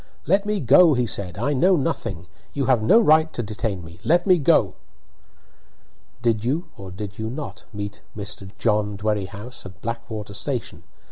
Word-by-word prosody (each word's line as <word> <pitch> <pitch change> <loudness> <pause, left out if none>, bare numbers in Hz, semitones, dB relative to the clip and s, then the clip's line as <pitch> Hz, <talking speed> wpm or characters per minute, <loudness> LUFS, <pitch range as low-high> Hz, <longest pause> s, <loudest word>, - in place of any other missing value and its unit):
"Let 195 +4 +2
me 210 -1 0
go," 145 +3 +6
he 125 -1 +1
said. 95 -5 -4
"I 135 +7 0
know 180 +8 +4
nothing 115 - -2 0.3
you 140 -2 -1
have 125 -4 +3
no 205 - +6
right 160 -6 +4
to 120 - -2
detain 105 -3 -3
me 85 +1 -13
let 175 +2 +3
me 185 -3 +5
go!" 140 - +3 1.5
"Did 115 -3 +1
you, 155 +8 -1
or 95 -1 -9
did 100 +2 -7
you 110 0 -2
not, 140 +5 -7
meet 100 -1 -6 0.2
Mr. 100 -1 -5
John 105 -2 +1
Dwerrihouse 105 +2 -3
at 95 +1 -11
Blackwater 115 -2 -5
station? 110 - -4
115 Hz, 165 wpm, -23 LUFS, 100-145 Hz, 1.5 s, go